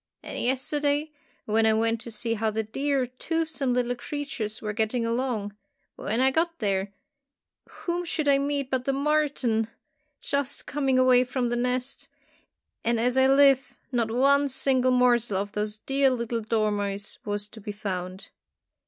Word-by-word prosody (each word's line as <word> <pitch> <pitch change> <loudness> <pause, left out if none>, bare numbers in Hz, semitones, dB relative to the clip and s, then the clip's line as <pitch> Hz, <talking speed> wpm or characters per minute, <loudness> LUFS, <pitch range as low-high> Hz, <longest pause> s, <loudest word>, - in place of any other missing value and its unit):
And - - -4
yesterday, 290 +4 0 0.3
when 220 +1 +3
I 220 - +5
went 225 +1 +1
to 235 - -7
see 230 +1 -1
how 220 0 0
the 220 +1 -1
dear 270 +4 0
toothsome 300 +2 -2
little 245 0 +1
creatures 245 -4 -5
were 215 -1 -4
getting 225 +2 0
along, 230 -4 -2 0.4
when 225 +3 -2
I 265 0 +5
got 335 +3 0
there, 195 -3 -1 0.8
whom 350 0 -3
should 315 -3 -2
I 275 -1 +5
meet 280 -1 -2
but 255 -1 0
the 275 - +1
marten 275 -6 +1 0.5
just 280 -2 -2
coming 270 -3 0
away 255 -1 +5
from 250 -1 -1
the 240 - 0
nest, 250 +2 -2 0.7
and 235 0 +1
as 245 +2 +2
I 265 0 +5
live, 275 -1 +4 0.2
not 235 -3 0
one 280 +4 +3
single 260 -1 +2
morsel 240 -4 +3
of 200 +1 -3
those 210 0 -3
dear 270 +4 +2
little 235 -2 -2
dormice 205 -2 -1
was 205 0 -3
to 220 - -12
be 210 +1 -5
found. 190 -2 -5
250 Hz, 160 wpm, -26 LUFS, 220-275 Hz, 0.8 s, I